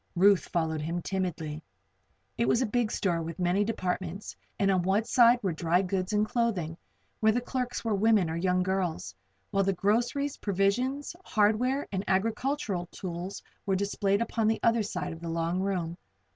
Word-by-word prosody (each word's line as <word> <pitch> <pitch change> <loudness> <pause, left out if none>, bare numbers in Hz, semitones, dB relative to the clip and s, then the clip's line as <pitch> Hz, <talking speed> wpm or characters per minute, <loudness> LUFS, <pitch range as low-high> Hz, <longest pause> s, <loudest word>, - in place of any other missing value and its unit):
Ruth 195 +1 +5
followed 160 -2 -1
him 170 +3 -3
timidly. 165 -5 -3 0.7
It 120 - 0
was 130 - +3
a 255 - +2
big 230 0 0
store 175 -4 0
with 165 0 -5
many 180 +3 +2
departments, 185 -2 -3 0.2
and 195 -1 +3
on 185 -2 +2
one 190 +5 +2
side 240 +1 +5
were 190 - +1
dry 170 +3 +1
goods 185 +1 -2
and 210 0 +2
clothing, 215 -9 -1 0.4
where 220 0 +4
the 240 - +1
clerks 245 -1 -3
were 225 - +1
women, 205 -2 +3
or 160 - -3
young 180 +1 +1
girls, 185 -3 -2 0.4
while 195 0 +2
the 195 0 +1
groceries, 240 +9 0
provisions, 245 - 0
hardware 235 - +1
and 190 -1 -2
agricultural 205 -1 0
tools 180 +2 -6 0.2
were 195 - +2
displayed 200 +2 +1
upon 225 -2 -1
the 220 - +2
other 230 0 +4
side 205 -4 -3
of 165 - -10
the 170 - -5
long 165 +2 -1
room. 180 -4 -1
195 Hz, 170 wpm, -29 LUFS, 175-220 Hz, 0.7 s, Ruth